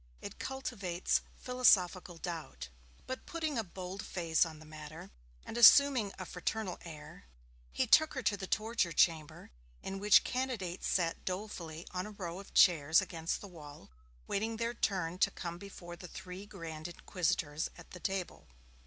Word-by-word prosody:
'It - - -8
cultivates 200 -10 -1 0.2
philosophical 185 -8 +3
doubt.' 155 - -6 0.4
But, 260 - -6
putting 315 -6 -2
a - - 0
bold 185 0 -7
face 165 -1 +1
on 160 -1 -9
the 155 - -13
matter, 155 0 -10 0.3
and - - -6
assuming 250 -4 +8
a 185 - -5
fraternal 185 +2 -3
air, 155 - -10 0.5
he - - +1
took 315 -1 +5
her 260 - -3
to 210 - +2
the 190 -1 -6
torture 215 -6 0
chamber, 160 -3 +1 0.3
in 195 0 -4
which 205 0 +6
candidates 240 -9 -2
sat 170 -3 0
dolefully 180 -4 -5
on 180 +2 -3
a 210 -1 -11
row 175 -1 -5
of 200 - -11
chairs 160 -4 +6
against 165 -1 -3
the 205 - -8
wall, 150 - -12 0.3
waiting 220 +3 -1
their 230 +1 -1
turn 185 -6 -1
to - - +5
come 170 0 -6
before 175 -3 -9
the 180 - -10
three 185 +3 -8
grand 165 -5 -7
inquisitors 170 -3 -1
at 175 - -14
the 180 - -9
table. 190 0 -3
180 Hz, 160 wpm, -33 LUFS, 165-210 Hz, 0.5 s, assuming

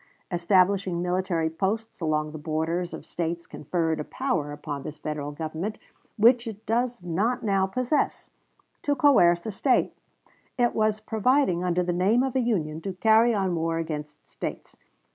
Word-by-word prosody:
Establishing 185 +1 +2
military 180 -2 0
posts 205 +5 -2
along 155 -1 0
the 155 - -7
borders 165 +3 -2
of - - -8
States 170 0 -3
conferred 160 +1 -2
a - - -2
power 180 - -2
upon 145 -1 -5
this 150 +2 -7
Federal 150 -1 -4
Government, 160 +7 -4 0.4
which 235 +2 +5
it 220 0 -8
does 240 -2 -1
not 195 +9 0
now 195 -3 +2
possess, 255 +8 -1 0.5
to 290 -2 +1
coerce 175 -12 +4
a 220 - -2
State; 250 +6 +1 0.6
it 240 -1 +2
was 215 -1 +1
providing, 220 -4 +2
under 180 0 +1
the 175 0 -1
name 200 +8 +3
of 265 -1 -2
Union, 180 -12 0
to 190 +3 -4
carry 220 +5 +4
on 195 -4 0
war 165 0 -1
against 150 -2 -5
States. - - -7
180 Hz, 155 wpm, -26 LUFS, 165-225 Hz, 0.6 s, which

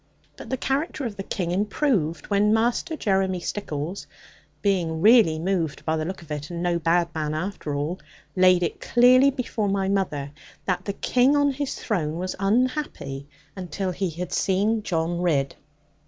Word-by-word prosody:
But - - -10
the 260 - -1
character 275 +2 -2
of 220 -4 -4
the 195 - -5
King 180 -2 -3
improved, 190 - 0
when 210 +2 +4
Master 240 +8 0
Jeremy 190 -4 +1
Stickles 170 -2 -4 0.6
(being 175 -5 +1
really 210 -4 +6
moved 165 -3 -2
by 160 - +1
the 155 -1 -2
look 185 +1 -6
of 155 - -14
it, 150 0 -4
and 170 0 -4
no 175 -1 +1
bad 170 +1 +2
man 155 -1 -2
after 160 -3 -3
all) 150 +6 -2 0.4
laid 185 -1 +5
it 170 - -3
clearly 255 +3 +5
before 235 -6 -2
my 195 -1 0
mother 150 -8 -1 0.3
that 185 -1 -1
the 200 - -2
King 255 +7 +2
on 285 -1 +3
his 280 0 -3
throne 165 -8 -2
was 185 +1 -3
unhappy, 210 - -1 0.3
until 185 0 -3
he 185 +1 -2
had 175 +2 -6
seen 205 +4 +1
John 170 -2 -1
Ridd. 145 -6 +1
185 Hz, 170 wpm, -24 LUFS, 165-215 Hz, 0.6 s, really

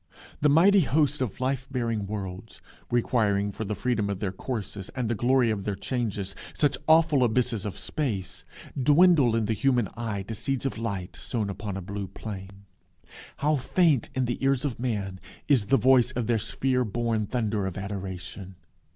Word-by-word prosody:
The 150 - +4
mighty 185 +7 +6
hosts 145 -1 +2
of 125 -4 -2
life 130 0 -1
bearing 115 -6 -2
worlds, 100 0 -6 0.3
requiring 105 -4 +1
for 110 +3 -5
the 105 +1 -2
freedom 115 -4 0
of 100 - -2
their 95 -1 -2
courses, 100 -2 -5
and 125 -2 -1
the 115 - 0
glory 120 +1 +3
of 100 -2 -2
their 100 0 -2
changes, 105 -5 -3 0.2
such 145 -2 +2
awful 160 -4 +5
abysses 115 -3 +1
of 100 -1 -6
space, 105 -4 -3 0.3
dwindle 145 -2 +5
in 115 -1 +1
the 110 - 0
human 125 -2 +2
eye 110 -4 -3
to 110 - -6
seeds 135 +5 -2
of 135 - -2
light 100 -6 -4
sown 110 -5 -3
upon 100 0 -5
a 95 - -5
blue 100 +1 -5
plain. 95 -1 -8 0.7
How 150 +1 +2
faint 150 -1 +2
in 130 -1 +1
the 120 +2 -3
ears 135 0 +2
of 130 -6 -3
man 100 -6 -2 0.3
is 125 -9 +3
the 135 - +4
voice 130 -2 +5
of 125 -2 -2
their 115 0 +1
sphere 125 +4 0
born 115 -1 -1
thunder 110 -5 -1
of 90 - -5
adoration! 95 -1 -6
115 Hz, 175 wpm, -27 LUFS, 100-130 Hz, 0.7 s, mighty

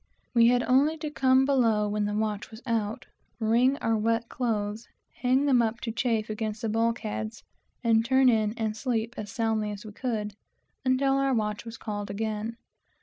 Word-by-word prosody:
We 235 -1 +6
had 245 0 +3
only 285 +5 +3
to 305 -1 -5
come 260 -2 +4
below 230 -6 +2
when 210 0 -1
the 205 0 -2
watch 210 -1 -2
was 220 +2 -12
out, 225 -3 -1 0.3
wring 235 +4 +3
out - - -12
our 225 - +2
wet 230 +2 0
clothes, 215 -3 -2 0.3
hang 260 +3 +2
them 260 -4 +4
up, 225 0 0
and 220 -1 -1 0.7
turn 260 +2 +4
in 215 -2 +2
and 220 -2 -1
sleep 235 -1 -2
as 210 -1 -6
soundly 225 -2 0
as 205 +1 -7
we 215 - -8
could, 210 -3 -3 0.5
until 270 +1 +2
the 270 -1 +2
watch 210 0 -2
was 230 0 -8
called 205 -2 -5
again. 220 +2 -3
225 Hz, 160 wpm, -27 LUFS, 215-250 Hz, 0.7 s, We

